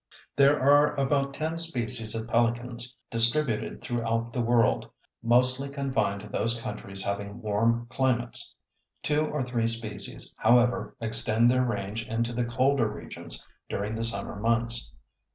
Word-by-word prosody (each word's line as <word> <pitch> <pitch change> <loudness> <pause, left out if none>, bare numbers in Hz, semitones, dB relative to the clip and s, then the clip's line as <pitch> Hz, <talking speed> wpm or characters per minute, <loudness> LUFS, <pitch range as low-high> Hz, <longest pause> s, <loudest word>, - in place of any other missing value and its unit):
There 140 +1 +5
are 145 +2 +4
about 140 0 0
ten 160 +2 -2
species 120 -8 +1
of 110 0 -4
pelicans 120 +1 -1
distributed 115 +1 0
throughout 115 -1 -2
the 125 - -1
world, 115 - +2 0.3
mostly 125 +3 +2
confined 135 -8 -1
to 105 - -10
those 115 +3 -1
countries 100 -5 -6
having 100 +2 -4
warm 115 +3 0
climates. 125 -1 -1 0.5
Two 150 +1 +1
or 150 -3 -2
three 120 -2 -1
species, 115 -1 -4
however, 120 +2 +3
extend 115 +1 +5
their 125 0 +2
range 105 -2 -3
into 115 +1 -2
the 120 0 -1
colder 125 +1 +2
regions - - -7 0.2
during 105 +2 -3
the 115 +1 -3
summer 100 -3 -3
months. 115 +2 0
120 Hz, 135 wpm, -27 LUFS, 115-130 Hz, 0.5 s, There